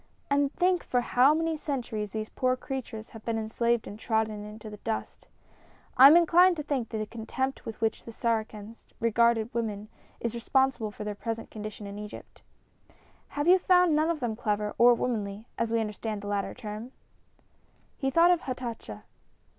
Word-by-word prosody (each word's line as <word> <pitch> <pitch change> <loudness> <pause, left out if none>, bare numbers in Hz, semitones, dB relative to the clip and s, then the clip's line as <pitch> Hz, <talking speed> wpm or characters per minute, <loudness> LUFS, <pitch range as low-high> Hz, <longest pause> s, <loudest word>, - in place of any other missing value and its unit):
And 280 0 +2
think 360 -1 +2
for 245 - +1
how 255 +5 +4
many 325 0 0
centuries 250 -8 -3
these 215 +1 -4
poor 255 0 +1
creatures 240 -5 -6
have 225 -1 -11
been 230 -1 -1
enslaved 235 +1 0
and 205 - -9
trodden 220 -2 -1
into 215 +1 -10
the 210 -1 -8
dust. 220 +1 -5 0.7
I 265 +2 +10
am 305 +4 +8
inclined 350 +2 +5
to 300 - -3
think 270 -6 -2
the 215 -1 -3
contempt 235 +5 -4
with 225 - -6
which 225 -1 0
the 230 - -9
Saracens 220 -1 -4
regarded 230 0 +2
women 215 -3 -3 0.3
is 235 -1 -2
responsible 240 -1 +1
for 210 - -8
their 210 0 -3
present 225 +2 -5
condition 215 -1 -7
in 200 +1 -7
Egypt. 210 0 -10 1.0
Have 290 +2 0
you 370 +1 +7
found 360 -3 +4
none 310 +2 +2
of 325 -3 -1
them 235 -3 -1
clever 210 -2 -1
or 240 +1 +7
womanly, 215 -3 -3
as 230 -1 0
we 230 - +2
understand 215 -1 -4
the - - -6
latter 205 -1 -2
term?" 225 +1 -7 1.0
He 270 - -1
thought 335 +5 +5
of 350 - +2
Hatatcha. 250 -3 -6
230 Hz, 175 wpm, -28 LUFS, 215-270 Hz, 1.0 s, I